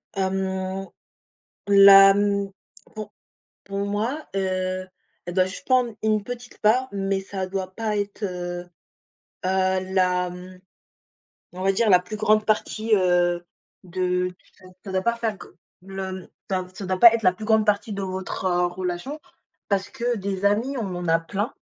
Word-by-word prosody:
Mmh. 190 0 -2 0.8
La 195 -1 +9
mmh. 200 -1 0 0.4
Pour 215 -1 -7 0.5
pour 200 0 -5
moi, 225 +9 -2
heu, 185 -1 -1 0.4
je - - -3
dois 185 +1 +3
juste 185 +1 -8
prendre 250 -3 +2
une 215 -1 +1
petite 245 +2 -8
part, 245 +5 +3
mais 195 -1 -1
ça 190 -1 -5
doit 185 0 -4
pas 220 0 -2
être, 205 +1 -4
heu, 175 -2 -4 0.8
heu, 185 0 +1
la 180 -1 +2
mmh, 180 +1 -11 0.9
on 185 - -7
va 195 - +4
dire 215 +3 +1
la 180 -2 +7
plus 180 +4 -7
grande 215 0 +3
partie, 215 +1 0
heu, 175 -2 +2 0.4
de 180 0 -1 0.3
ça 185 - -18 0.2
ça 195 - -6
doit 190 0 0
pas 235 +2 +1
faire 230 -2 -2
g - - -11 0.4
le 190 -1 -6 0.2
ça 185 -1 -1
ça 195 - -7
doit 185 0 -1
pas 235 +1 +9
être 230 - 0
la 185 - +5
plus 215 +4 -8
grande 220 -1 +3
partie 210 0 0
de 200 - -4
votre, 190 0 -4
heu, 180 0 +2
relation 180 - -4 0.5
parce 195 -1 0
que 245 -2 -2
des 195 0 -3
amis, 230 +7 +1
on 195 -6 -3
en 175 0 -4
a 165 0 +4
plein 205 +8 -3
195 Hz, 165 wpm, -24 LUFS, 185-215 Hz, 0.9 s, La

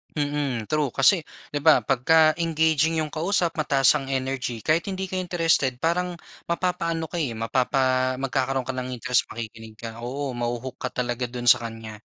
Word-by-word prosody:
Mm, 145 -5 -1
true. 155 -1 +2
Kasi 155 +8 +5 0.3
di 145 - -1
ba, 155 +2 +5
pagka-engaging 160 +3 +3
yung 155 - -6
kausap 170 +1 0
mataas 140 -3 +4
ang 135 - -8
energy 130 -3 -3
kahit 160 +4 +1
hindi 190 -1 -4
ka 185 - -1
interested 165 -7 +1
parang 175 +6 -1 0.3
mapapa 170 -1 -1
ano 165 - -3
ka 175 - -2
eh. 130 -8 -2
Mapapa 130 +2 +1
magkakaroon 135 0 -1
ka 130 - -3
ng 130 0 -4
interest, 125 +1 +1
makikinig 110 -1 -8
ka. 115 0 -8
Oo 135 +3 -4
maho-hook 120 +1 -4
ka - - -2 0.2
talaga 120 0 -2
dun 120 0 -6
sa - - +4
kanya. 110 -1 -9
135 Hz, 170 wpm, -24 LUFS, 125-160 Hz, 0.3 s, Kasi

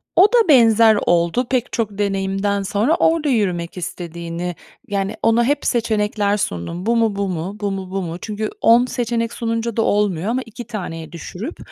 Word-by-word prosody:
O 375 - +7
da 465 -5 +5
benzer 225 -5 +6
oldu 175 +8 +2
pek 250 -2 -1
çok 215 -4 -2
deneyimden 195 0 0
sonra. 210 - +1
Orada 325 -3 +2
yürümek 185 -8 -1
istediğini 170 0 -5 0.3
yani, 200 +1 -2
ona 230 +1 +4
hep 290 +3 0
seçenekler 210 -3 +1
sundum. 170 - -4
Bu 235 +1 +2
mu, 225 -3 +2
bu 200 0 -1
mu, 180 +3 -4
bu 200 -1 -1
mu, 190 -1 -5
bu 195 0 -2
mu? 170 -1 -5
Çünkü 215 0 -3
10 235 +2 +5
seçenek 235 -2 -2
sununca 230 -1 -2
da - - +3
olmuyor 200 -5 +1
ama 250 +3 0
2 230 +1 -10
taneye 175 -8 -6
düşürüp 180 - -7
210 Hz, 175 wpm, -20 LUFS, 185-230 Hz, 0.3 s, O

